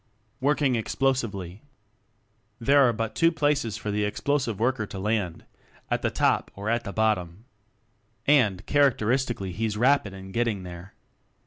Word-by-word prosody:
Working 140 Hz, -1 st, +2 dB
Explosively. 110 Hz, -6 st, -1 dB, 1.0 s
There 135 Hz, +2 st, +5 dB
are -, -, +3 dB
but 115 Hz, -1 st, -3 dB
two 165 Hz, 0 st, +3 dB
places 145 Hz, -8 st, 0 dB
for 105 Hz, -, -4 dB
the 105 Hz, +1 st, 0 dB
Explosive 115 Hz, +1 st, -1 dB
Worker 120 Hz, -2 st, 0 dB
to 100 Hz, -, -8 dB
land 100 Hz, -4 st, -2 dB, 0.5 s
at -, -, +1 dB
the -, -, +1 dB
top -, -, +1 dB
or 100 Hz, +3 st, -3 dB
at 120 Hz, 0 st, -1 dB
the 100 Hz, -, -4 dB
bottom. 105 Hz, -2 st, -1 dB, 0.8 s
And, 110 Hz, -10 st, +3 dB
characteris 135 Hz, -3 st, +2 dB
tically 95 Hz, -5 st, -5 dB
he's 105 Hz, +3 st, -2 dB
rapid 125 Hz, -3 st, +3 dB
in 95 Hz, 0 st, -10 dB
getting 115 Hz, -3 st, -1 dB
there. 90 Hz, +1 st, -10 dB
110 Hz, 145 wpm, -26 LUFS, 100-130 Hz, 1.0 s, There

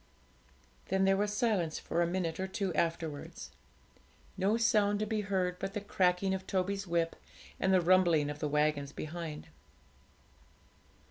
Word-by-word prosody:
Then 190 Hz, 0 st, +2 dB
there 195 Hz, 0 st, +4 dB
was 205 Hz, +1 st, 0 dB
silence 205 Hz, -7 st, 0 dB
for 170 Hz, -, -1 dB
a 170 Hz, -, +2 dB
minute 170 Hz, -2 st, -2 dB
or 190 Hz, -, -1 dB
two 190 Hz, -1 st, -2 dB
afterwards 165 Hz, -3 st, -3 dB, 0.8 s
no 200 Hz, +4 st, +2 dB
sound 210 Hz, -3 st, +3 dB
to 215 Hz, -, -1 dB
be 215 Hz, 0 st, -1 dB
heard 185 Hz, -3 st, -1 dB
but 195 Hz, 0 st, -4 dB
the -, -, 0 dB
cracking 190 Hz, -1 st, +1 dB
of 190 Hz, 0 st, -4 dB
Toby's 195 Hz, +1 st, -1 dB
whip 170 Hz, -1 st, 0 dB, 0.4 s
and 190 Hz, -, +2 dB
the 185 Hz, -1 st, +5 dB
rumbling 175 Hz, -4 st, +4 dB
of 150 Hz, -, -8 dB
the 150 Hz, -, -1 dB
waggons 150 Hz, -1 st, +1 dB
behind. 155 Hz, 0 st, -6 dB
185 Hz, 150 wpm, -32 LUFS, 165-200 Hz, 0.8 s, the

